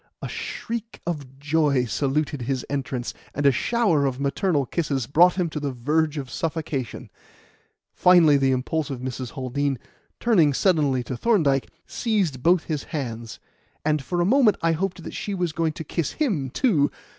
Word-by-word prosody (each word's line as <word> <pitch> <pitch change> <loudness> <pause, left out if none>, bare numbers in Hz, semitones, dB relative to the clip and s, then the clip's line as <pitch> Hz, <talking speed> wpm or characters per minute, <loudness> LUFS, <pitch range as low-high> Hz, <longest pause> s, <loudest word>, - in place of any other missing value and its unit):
A - - -5
shriek 230 -1 -5
of 145 -6 -5
joy 145 -3 +2
saluted 140 +3 -1
his 130 +1 -2
entrance, 130 -3 -3 0.2
and 145 - -1
a 140 - +7
shower 165 - +2
of 130 -1 -3
maternal 145 +1 +1
kisses 140 -3 -1
brought 175 +7 +5
him 180 -2 0
to 150 - -3
the 145 -1 -2
verge 150 +5 0
of 135 -3 -5
suffocation. 155 -7 -3 0.8
Finally, 170 -5 +6
the 135 -1 +2
impulsive 135 +1 -1
Mrs. 130 -1 -5
Haldean, 135 +1 -1 0.4
turning 170 - +3
suddenly 145 -9 +2
to 125 - -5
Thorndyke, 150 - +2 0.2
seized 195 - -1
both 175 +3 +4
his 150 -4 -3
hands, 115 -6 -5 0.5
and 155 -1 +2
for 175 +6 -1
a - - +2
moment 235 0 +4
I 165 - +3
hoped 180 +1 -2
that - - -7
she 205 - -3
was 175 -3 -1
going 160 -1 -1
to 160 - -6
kiss 160 0 -2
him, 195 - -1
too. 155 - +2
150 Hz, 165 wpm, -24 LUFS, 135-175 Hz, 0.8 s, a